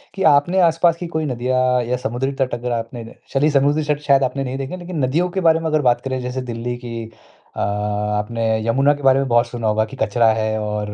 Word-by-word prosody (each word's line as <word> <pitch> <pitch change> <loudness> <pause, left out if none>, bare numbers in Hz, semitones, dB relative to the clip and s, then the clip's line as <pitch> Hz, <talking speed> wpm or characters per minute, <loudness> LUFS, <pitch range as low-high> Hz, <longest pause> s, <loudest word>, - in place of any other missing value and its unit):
कि 190 - -2
आपने 155 +5 +4
आस-पास 165 0 +3
की 175 0 -5
कोई 160 -1 -2
नदियाँ 125 -1 +1
या 125 +2 -1
समुद्री 130 +4 -2
तट 130 -2 0
अगर 120 +1 -3
आपने 115 0 -4 0.3
चलिए 145 +3 +2
समुद्री 145 +2 +2
तट 150 -1 0
शायद 140 -2 +3
आपने 135 +2 -1
नहीं 130 0 -4
देखे 135 +4 -5
हैं, 185 - -5
लेकिन 175 -5 -4
नदियों 165 +8 0
के 190 +1 -3
बारे 160 0 +5
में 165 - -3
अगर 155 -1 +1
बात 120 0 +1
करें 130 -1 -2
जैसे 125 +1 -4
दिल्ली 120 +1 -4
की 115 -1 -5 0.5
अ, - - -3
आपने 105 +2 -1 0.2
यमुना 135 +5 +3
के 145 -1 -9
बारे 135 0 +5
में 135 - -1
बहुत 120 -1 +3
सुना 120 -2 -4
होगा 110 +1 +2
कि 135 - -11
कचरा 115 -2 +3
है 110 0 -1
और 105 -1 -3
130 Hz, 235 wpm, -20 LUFS, 115-145 Hz, 0.5 s, बारे